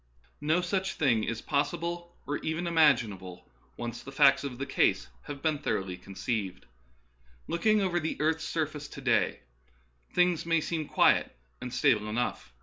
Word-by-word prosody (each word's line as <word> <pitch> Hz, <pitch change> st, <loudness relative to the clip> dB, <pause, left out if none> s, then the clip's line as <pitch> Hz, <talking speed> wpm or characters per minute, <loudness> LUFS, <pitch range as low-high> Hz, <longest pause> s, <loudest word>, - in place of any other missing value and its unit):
No 155 Hz, +4 st, +2 dB
such 190 Hz, +2 st, -1 dB
thing 120 Hz, -7 st, +2 dB
is 115 Hz, 0 st, -3 dB
possible 170 Hz, +4 st, -2 dB
or 145 Hz, +1 st, -2 dB
even 160 Hz, +2 st, -2 dB
imaginable, 115 Hz, -, +2 dB, 0.3 s
when 120 Hz, 0 st, -4 dB
once 120 Hz, -, -9 dB
the 135 Hz, -, -9 dB
facts 140 Hz, 0 st, +5 dB
of 135 Hz, -3 st, -5 dB
the 135 Hz, -, -3 dB
case 135 Hz, -, +1 dB, 0.2 s
have 140 Hz, -1 st, -7 dB
been 155 Hz, -3 st, +1 dB
thoroughly 95 Hz, -9 st, -2 dB
conceived. 95 Hz, +2 st, -4 dB, 0.8 s
Looking 215 Hz, +5 st, +2 dB
over 175 Hz, -2 st, +1 dB
the 160 Hz, -1 st, -3 dB
earth's 160 Hz, +1 st, +1 dB
surface 150 Hz, -2 st, -3 dB
to 140 Hz, -, -10 dB
day, 120 Hz, -5 st, +1 dB, 0.7 s
things 180 Hz, -2 st, +2 dB
may 165 Hz, 0 st, +2 dB
seem 155 Hz, -1 st, -3 dB
quiet -, -, +3 dB, 0.2 s
and 125 Hz, -, -5 dB
stable 110 Hz, -7 st, +2 dB
enough. 120 Hz, -, -2 dB
145 Hz, 155 wpm, -29 LUFS, 115-165 Hz, 0.8 s, facts